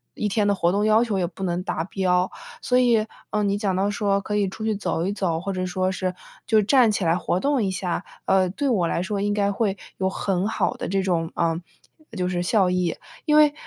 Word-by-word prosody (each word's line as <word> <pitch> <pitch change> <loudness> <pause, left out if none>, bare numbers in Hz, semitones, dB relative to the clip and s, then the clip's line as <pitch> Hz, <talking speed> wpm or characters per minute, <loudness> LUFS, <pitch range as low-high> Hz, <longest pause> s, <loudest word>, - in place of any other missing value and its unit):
一 210 - -1
天 205 0 +1
的 200 - +3
活 170 -2 +2
动 205 +2 +1
要 215 +2 +5
求 210 -5 -1
也 175 - 0
不 180 +2 -8
能 175 -1 -1
达 160 -4 -2
标。 180 0 +1 0.3
所 250 - +2
以， 235 -4 +3 0.3
嗯， 210 -1 +1
你 200 0 +1
讲 200 -3 0
到 195 +2 +1
说 200 -1 +1
可 210 +1 -3
以 205 -1 +2
出 215 - -8
去 220 -1 +1
走 175 -4 -2
一 195 - -1
走， 175 -5 -1
或 195 +3 -3
者 185 -1 -2
说 185 +1 0
是 185 -1 -2 0.3
就 220 - +4
是 215 - +5
站 240 +1 +5
起 200 -3 -1
来 165 +1 +3
活 180 0 -1
动 280 0 +1
一 195 - 0
下， 180 -1 -2 0.2
呃， 190 -1 +3
对 280 +10 -2
我 190 -9 +2
来 170 - -1
说 200 +1 -2
应 205 0 0
该 200 -1 +1
会 200 -1 -1 0.2
有 190 0 0
很 190 0 -1
好 225 - 0
的 - - -5
这 195 +1 0
种， 170 -3 -1
呃， 165 -1 +1 0.6
就 180 -1 0
是 175 -1 -1
效 190 0 +3
益。 180 -2 0 0.3
因 300 -2 +3
为， 300 -1 +6
195 Hz, 265 characters per minute, -24 LUFS, 180-210 Hz, 0.6 s, 为